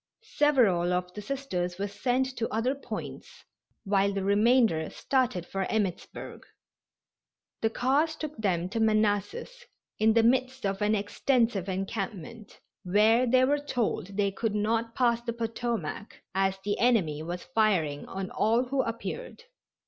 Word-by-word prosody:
Several 215 -13 +3
of 180 0 -2
the 210 - -6
Sisters 200 -9 -3
were 200 +1 -2
sent 250 +6 -1
to 230 - -2
other 230 +4 +1
points, 280 - -8 0.4
while 200 -1 +2
the 195 -1 -2
remainder 205 -4 +3
started 250 -10 0
for 195 +1 -3
Emmittsburg. 205 -5 -3 1.2
The 225 - +2
cars 280 +7 +1
took 310 -1 -6
them 180 -5 0
to 225 - -3
Manassas, 220 - 0 0.4
in 220 +1 +4
the 230 0 +4
midst 255 +1 +1
of 195 +1 -1
an 210 +1 +3
extensive 215 -1 0
encampment, 195 +2 -5 0.2
where 215 +6 +4
they 255 +2 +4
were 290 +2 +2
told 225 -8 -2
they 200 -1 +2
could 210 +2 -2
not 225 +2 0
pass 235 -2 +2
the 235 -1 -3
Potomac, 225 -4 -4
as 195 0 +1
the 205 0 -1
enemy 195 -11 +2
was 175 +2 -5
firing 175 -10 +1
on 190 -1 -5
all 230 +3 +2
who 265 +1 0
appeared. 230 - -5
220 Hz, 140 wpm, -28 LUFS, 195-245 Hz, 1.2 s, in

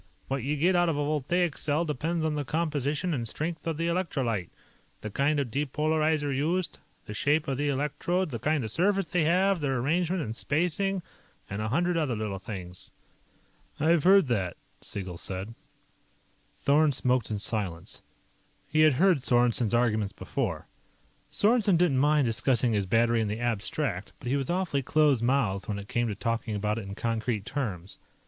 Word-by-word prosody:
What 135 0 -1
you 140 +5 -1
get 180 +5 +3
out 175 -1 +3
of 155 - -1
a 145 - 0
voltaic 155 +3 0
cell 155 +3 0
depends 160 +3 -1
on 155 - 0
the 150 -1 -2
composition 150 +2 -1
and 120 -5 -2
strength 165 +7 -4
of 160 -2 -1
the 165 - -1
electrolyte, 135 - -1 0.5
the 110 - -5
kind 145 +6 +1
of 130 -5 -2
depolarizer 150 +1 0
used, 170 +6 -1 0.3
the 105 - -7
shape 145 +9 +1
of 135 -1 -2
the 145 0 +1
electrodes, 150 +5 -1
the 115 - -4
kind 150 +2 0
of 110 - -4
surface 195 - +1
they 170 -2 +1
have, 185 +2 +3
their 135 -2 0
arrangement 170 +7 0
and 110 0 -5
spacing, 180 +7 0 0.4
and 100 +2 -4
a 110 - -1
hundred 175 +8 +1
other 145 -7 0
little 105 -3 -3
things." 90 -4 -8 0.9
"I've 160 0 +3
heard 195 0 +6
that," 100 -9 -1 0.2
Siegel 95 -4 -6
said. 95 +4 -5 1.0
Thorn 145 +1 +3
smoked 125 -2 +1
in 105 - -2
silence. 100 -5 -3 0.7
He 155 - 0
had 155 -2 +6
heard 175 +3 +4
Sorensen's 120 -2 +2
arguments 110 -4 +1
before. - - -3 0.7
Sorensen 210 -4 +3
didn't 165 -7 +3
mind 150 0 +3
discussing 120 +1 +2
his 100 -3 0
battery 115 +3 +3
in 110 - 0
the 105 +2 -3
abstract, 115 - -2
but 120 - -6
he 135 - +2
was 135 -2 -2
awfully 175 -6 0
close 145 -2 +3
mouthed 120 -6 +1
when 105 - -2
it 100 0 -8
came 120 +2 0
to 105 - -3
talking 115 0 -2
about 105 +2 -1
it 100 - -7
in 100 - -6
concrete 115 -2 -2
terms. 100 - -4
140 Hz, 175 wpm, -28 LUFS, 115-160 Hz, 1.0 s, heard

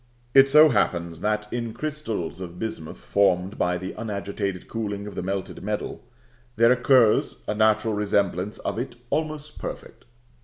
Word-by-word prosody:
It 135 0 +7
so 150 +2 +8
happens 85 - 0
that 105 0 0
in 115 -2 -3
crystals 120 - -4
of 90 -1 -7
bismuth 90 -7 -5
formed 95 -1 +1
by 90 0 +1
the 95 +2 -6
unagitated 100 -3 -4
cooling 105 -3 -4
of 105 - -7
the - - -4
melted 95 +1 -4
metal, 105 +1 -4 0.5
there 115 +1 +5
occurs 125 -3 +3
a - - 0
natural 110 +1 +2
resemblance 100 -1 0
of - - -3
it 125 - -4 0.2
almost 155 -1 -3
perfect. - - -8
105 Hz, 150 wpm, -25 LUFS, 95-120 Hz, 0.5 s, so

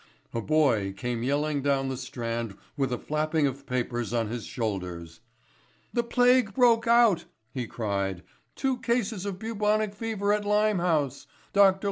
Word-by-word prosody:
A 115 - -1
boy 120 -9 +2
came 120 +3 -3
yelling 145 +3 0
down 135 -1 +1
the 130 - -2
Strand 115 -5 -4 0.2
with 135 -3 0
a 125 - 0
flapping 155 +2 0
of 140 0 -3
papers 120 -2 -2
on 115 -3 0
his 120 0 -5
shoulders. 90 -7 -4 0.7
"The 240 - +2
plague 245 -3 +3
broke 235 -2 +4
out," 235 -6 +5 0.3
he 125 -3 -3
cried; 100 -5 -2 0.3
"two 265 -2 -1
cases 230 -5 -1
of 195 -2 -4
bubonic 215 0 0
fever 205 -1 -1
at 210 0 0
Limehouse. 180 -10 +1 0.3
Dr. 195 -1 +5
150 Hz, 145 wpm, -27 LUFS, -, 0.7 s, out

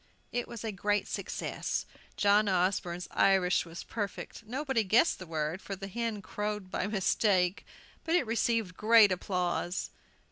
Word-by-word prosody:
It 245 0 -2
was 235 -2 -8
a 220 - -2
great 205 +1 0
success. - - -3 0.3
John 205 +1 +4
Osborne's 180 -1 0
Irish 185 -3 +3
was 165 +1 -8
perfect. 205 +1 -5
Nobody 265 -1 0
guessed 225 - +3
the 185 - -8
word, 160 +3 -2
for 195 - -5
the 195 +1 -7
hen 225 0 -3
crowed 210 -2 -4
by 185 - -1
mistake; 190 -2 +1 0.4
but 330 - +1
it 355 - +3
received 225 -4 0
great 220 -1 +6
applause. 180 -1 -1
200 Hz, 145 wpm, -30 LUFS, 185-225 Hz, 0.4 s, great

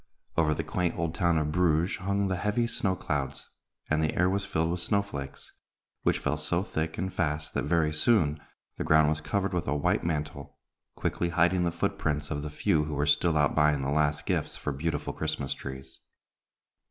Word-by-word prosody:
Over 75 -2 +3
the - - -2
quaint 90 -2 -1
old 85 -1 -1
town 85 -2 +2
of 75 -1 0
Bruges 85 0 +2
hung 100 +1 0
the 95 - 0
heavy 105 +6 0
snow 100 -4 0
clouds, 70 -5 -3 0.4
and 75 0 +1
the 80 - 0
air 90 +1 +3
was 100 +1 -1
filled 80 -1 0
with 90 - -2
snow 100 +3 +1
flakes, 70 -8 -7 0.5
which - - +2
fell 75 - -1
so 85 +4 0
thick 80 -5 -3
and 95 0 -2
fast 75 -3 -1
that - - -1
very 80 -3 +2
soon 75 -3 +3 0.4
the - - -2
ground 80 -1 +5
was 75 0 -1
covered 100 -2 -1
with 90 -2 -1
a 70 - +1
white 70 - +1
mantle, 75 -4 -3 0.4
quickly 85 - -1
hiding 85 +1 +3
the 85 - +1
foot 85 - -2
prints 75 0 -1
of 75 -1 -2
the 75 - -4
few 75 +1 +1
who 75 -1 -4
were 70 +1 +1
still 80 +2 +3
out 75 -2 +3
buying 75 -2 +3
the 70 - -1
last 75 0 +1
gifts - - -1
for - - -3
beautiful 80 +5 -2
Christmas 75 -3 -2
trees. 65 0 -8
80 Hz, 200 wpm, -28 LUFS, 75-90 Hz, 0.5 s, ground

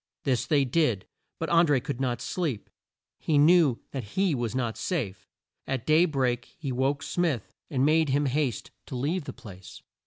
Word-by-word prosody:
This 130 -3 0
they 145 -4 +3
did, 125 - +1 0.3
but - - -3
An 170 0 +5
dré 135 -4 +2
could 135 -2 -4
not 120 -3 -1
sleep. 150 - -3 0.5
He 155 - +1
knew 150 -4 +5
that 120 - -7
he 190 -3 +3
was 120 -3 -2
not 120 -4 -1
safe. 100 - -3 0.4
At 130 -3 -2
day 155 +3 +5
break 130 -6 0
he 145 -6 -4
woke 135 +3 0
Smith, 165 - -1 0.2
and 135 -2 +1
made 155 0 +3
him 145 +2 +2
haste 135 -2 -1 0.2
to 135 - -6
leave 145 +6 -1
the - - -5
place. 95 -7 -12
135 Hz, 180 wpm, -27 LUFS, 120-155 Hz, 0.5 s, An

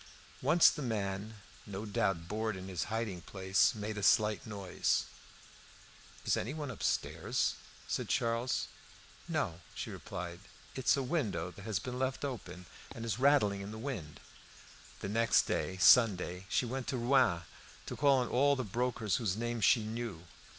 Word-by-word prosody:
Once 170 0 +6
the 150 - -6
man, 105 -3 -3 0.3
no 100 +1 -5
doubt 95 -5 0
bored 110 +1 -2
in 95 0 -7
his 90 -4 -2
hiding 110 -5 -3
place, 95 +2 +2
made 105 0 -4
a - - -4
slight 105 +4 +3
noise. 100 -4 0 1.2
"Is - - +3
anyone 145 +4 -3
walking - - -4
upstairs?" - - 0 0.3
said - - -2
Charles. 115 +2 0 0.6
"No," 85 +1 -2
she - - -5
replied; 85 0 -6 0.3
"it 130 - -6
is - - +6
a 135 - 0
window 110 - -1
that 100 +2 -12
has 110 -4 -1
been 125 +7 -5
left 130 +2 -1
open, 90 -9 -6 0.3
and 115 - -5
is 115 0 -2
rattling 130 -8 +4
in 100 - -6
the 110 - -7
wind." 110 - -5 0.8
The 100 - -3
next 115 +2 +4
day, 95 - -2
Sunday, 95 -4 +5
she - - +1
went 130 +2 -4
to 130 - -1
Rouen 120 -9 +3 0.4
to - - -5
call 140 -1 +4
on 125 - -1
all 140 +4 +3
the 130 - -2
brokers 115 -1 -1
whose 105 -5 -1
names 120 -1 0
she 115 -4 +5
knew. 110 -6 -5
110 Hz, 165 wpm, -33 LUFS, 95-125 Hz, 1.2 s, Once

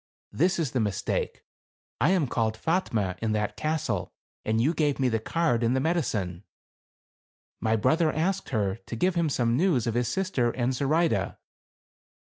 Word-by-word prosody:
This 180 +5 +2
is 155 -7 -1
the 130 - 0
mistake. 105 -4 -2 0.6
I 140 +8 +3
am 185 -5 +3
called 115 -3 0
Fatme 110 - -1
in 110 -1 0
that 105 -1 -1
castle, 155 0 -2 0.3
and 110 +1 0
you 140 +8 +2
gave 150 -4 0
me 130 -2 +3
the 115 -1 0
card 140 0 0
and 120 +2 +2
the - - +2
medi 165 +5 +1
cine! 90 - -3 0.6
" - - -72
My 110 0 +2
brother 155 - +2
asked 185 +5 -1
her 100 -2 0
to - - -4
give 180 +10 +1
him 170 -2 +1
some 120 -4 +1
news 150 - +2
of 115 - -1
his 120 0 0
sister 135 -5 0
and 120 +2 -1
Zoraide. 155 +6 +1
130 Hz, 175 wpm, -27 LUFS, 115-165 Hz, 0.6 s, I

